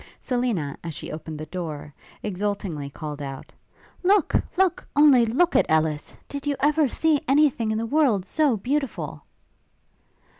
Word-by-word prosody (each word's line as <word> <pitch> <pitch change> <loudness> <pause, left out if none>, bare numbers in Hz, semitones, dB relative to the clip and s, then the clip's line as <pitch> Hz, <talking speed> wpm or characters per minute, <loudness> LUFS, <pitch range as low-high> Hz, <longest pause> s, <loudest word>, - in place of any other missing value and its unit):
Selina, 240 - -1
as 165 -3 -5
she - - -7
opened 155 0 -7
the 155 - -5
door, 155 -3 -6 0.3
exultingly 195 -7 -3
called 150 0 -7
out, 135 -1 -7 0.5
'Look! 385 -1 +3 0.2
look! 375 -2 +1
only 280 -5 +6
look 335 +10 +2
at - - +4
Ellis! 155 -1 0
did 285 0 -6
you 285 - +1
ever 300 0 +3
see 310 +2 +1
any 290 +2 +5
thing 230 -3 -3
in 220 - 0
the 225 - -1
world 235 -8 +2
so 285 +1 +2
beautiful?' 275 +5 -3
225 Hz, 150 wpm, -24 LUFS, -, 0.5 s, only